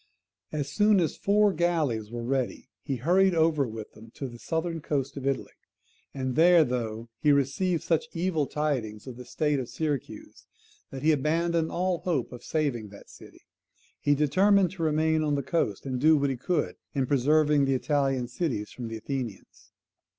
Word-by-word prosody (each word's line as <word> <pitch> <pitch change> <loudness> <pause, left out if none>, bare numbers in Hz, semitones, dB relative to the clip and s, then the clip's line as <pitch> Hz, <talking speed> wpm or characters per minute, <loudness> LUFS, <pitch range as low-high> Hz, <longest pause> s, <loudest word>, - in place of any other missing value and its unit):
As 145 -2 -2
soon 210 +2 +4
as 165 -4 0
four 205 0 +3
galleys 155 -11 0
were 120 0 -5
ready, 130 0 -2
he 135 - -3
hurried 180 +8 +3
over 160 -4 +2
with 110 -1 -8
them 110 +1 -14
to 135 - -4
the 120 -1 -11
southern 165 +5 -2
coast 140 -2 -2
of 135 -1 -4
Italy; 135 -1 -1 0.6
and 130 -2 -3
there, 170 0 +6
though 115 -3 -3
he 150 - +4
received 145 +6 +1
such 165 +7 0
evil 165 -4 0
tidings 130 -9 -2
of 130 -2 -8
the 125 +1 -10
state 150 0 0
of 125 -2 -5
Syracuse 145 0 -5 0.4
that 135 0 -8
he 160 - +5
abandoned 160 +3 +1
all 180 -1 0
hope 155 -9 -1
of 125 - -10
saving 135 -9 -1
that 100 - -14
city, - - -15 0.6
he 145 - +2
determined 185 +6 +3
to 185 - -8
remain 160 0 +2
on 150 -2 +1
the 140 - -2
coast, 125 - -1
and 130 -2 -3
do 155 +1 +6
what 140 -1 +1
he - - -2
could 150 +5 -1 0.2
in 135 -2 +1
preserving 145 +2 +3
the 135 0 +1
Italian 135 -2 0
cities 120 -6 -3
from 120 -2 -6
the 115 0 -5
Athenians. 120 -3 -6
145 Hz, 180 wpm, -27 LUFS, 125-165 Hz, 0.6 s, there